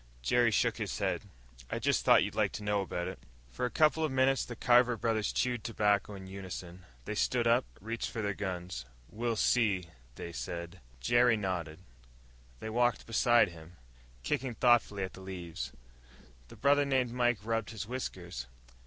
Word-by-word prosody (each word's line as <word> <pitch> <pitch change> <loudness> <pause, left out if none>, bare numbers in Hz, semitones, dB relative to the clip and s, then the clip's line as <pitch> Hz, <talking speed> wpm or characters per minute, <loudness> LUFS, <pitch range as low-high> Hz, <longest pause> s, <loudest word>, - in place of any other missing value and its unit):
Jerry 120 - +4
shook 110 - +1
his - - -3
head. - - 0 0.5
"I - - -2
just - - +1
thought - - +6
you'd - - -3
like - - +1
to 105 - -5
know 105 -1 +1
about 90 -2 -3
it." 95 - -6 0.3
For 125 - -1
a - - -5
couple 155 +5 +3
of 155 - 0
minutes 130 0 +3
the 120 - -7
Carver 125 0 +4
brothers 110 -2 0
chewed 125 -3 0
tobacco 105 -2 +1
in 95 -1 -9
unison. 90 -2 -8 0.2
They - - -3
stood 120 +3 +1
up, 120 +2 +4
reached 115 +3 -4
for 110 - -4
their 100 -1 0
guns. 90 -10 -4 0.3
"We'll 115 +1 -1
see," 100 -7 +2 0.3
they 85 - -6
said. 85 +2 -6 0.2
Jerry 120 -1 +4
nodded. 90 -5 -3 0.8
They 110 - -4
walked 120 +1 +1
beside 120 0 +4
him, 85 0 -13 0.5
kicking 130 - -1
thoughtfully 115 -5 +3
at 95 - -5
the 95 - -11
leaves. 90 -3 -6 0.8
The - - -13
brother 145 +1 +4
named 130 -3 +1
Mike 120 -1 +2
rubbed 115 -1 -1
his 105 -2 -6
whiskers. 90 - -5
110 Hz, 170 wpm, -32 LUFS, 95-120 Hz, 0.8 s, thought